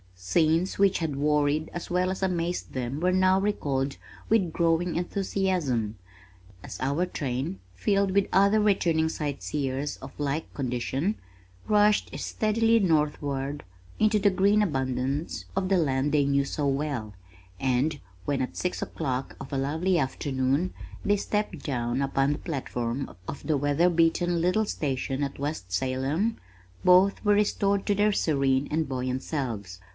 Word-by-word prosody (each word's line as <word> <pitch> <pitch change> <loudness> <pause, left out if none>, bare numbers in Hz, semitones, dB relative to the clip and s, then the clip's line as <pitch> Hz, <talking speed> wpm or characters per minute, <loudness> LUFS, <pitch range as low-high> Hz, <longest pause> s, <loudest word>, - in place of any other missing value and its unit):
Scenes 160 - +1
which 195 -1 +4
had 160 -4 -2
worried 150 +1 +1
as 175 - -6
well 180 +1 +1
as 190 - -5
amazed 175 -1 -1
them 130 +2 -3
were 180 +2 +2
now 185 +1 +4
recalled 140 -9 -1 0.3
with 195 -7 +2
growing 170 +1 +1
enthusiasm, 175 - -1 0.7
as - - -8
our 140 +7 0
train, 125 - -3 0.2
filled 200 - +1
with 200 0 +2
other 200 +3 +4
returning 170 -6 +2
sightseers 140 - -3
of - - -10
like 145 +2 -2
condition, 135 - -1 0.5
rushed 210 0 +3
steadily 225 +1 +2
northward 145 -5 0 0.4
into 215 0 +3
the 205 0 +4
green 200 +3 +3
abundance 135 -3 -1
of 190 -1 0
the 195 - +4
land 140 -3 +1
they 145 -2 +3
knew 140 0 +2
so 145 +1 -2
well, 135 -6 -2 0.5
and 135 +4 +1 0.3
when 140 -2 0
at - - -6
six 180 - -2
o'clock 130 -4 -3
of 135 - -9
a 140 - -1
lovely 160 +7 +1
afternoon, 135 +4 0 0.3
they 205 0 +2
stepped 205 -6 -2
down 120 -1 -1
upon 135 +1 +1
the 150 - -6
platform 130 -4 -3
of 140 - -6
the 155 -3 +2
weather 145 +5 +3
beaten 170 +1 +2
little 185 +6 +2
station 135 -5 -2
at 140 0 -4
West 140 -11 -4
Salem, 135 - 0 0.5
both 185 +2 +5
were 205 - +5
restored 200 -1 +1
to 205 - +2
their 210 +1 +3
serene 140 -6 +1
and 160 +1 0
buoyant 130 0 -2
selves. 110 - -4
150 Hz, 145 wpm, -27 LUFS, 135-185 Hz, 0.7 s, both